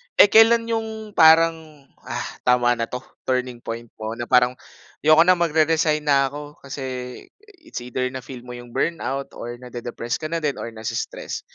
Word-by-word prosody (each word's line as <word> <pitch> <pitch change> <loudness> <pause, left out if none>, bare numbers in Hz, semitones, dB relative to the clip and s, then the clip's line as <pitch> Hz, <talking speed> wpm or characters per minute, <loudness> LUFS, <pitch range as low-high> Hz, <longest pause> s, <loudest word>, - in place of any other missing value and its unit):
Eh, 205 - +7
kailan 230 +1 +6
'yong 220 -1 -4
parang, 160 -2 +4 0.2
ah, - - -3 0.2
tama 125 -1 +4
na 115 - -1
'to, 125 +1 -6 0.3
turning 125 -1 -1
point 115 0 -7
mo 110 0 -4
na 120 - -4
parang, 125 0 +4 0.5
ayoko 155 +2 +7
na 185 - +7
magre-resign 155 -2 +2
na 140 -2 +3
ako. 145 0 -9
Kasi, 140 +1 -7 0.8
it's 320 - -8
either 125 +1 -3
na 130 - -5
feel 130 -1 -9
mo 125 - -8
'yong 120 0 -11
burnout 135 -1 -2
or 120 0 -7
nade-depress 120 -1 -5
ka 155 - -4
na 165 - 0
din, 150 -3 -1
or - - -5
na-stress, 110 0 -5
140 Hz, 170 wpm, -22 LUFS, 125-160 Hz, 0.8 s, Eh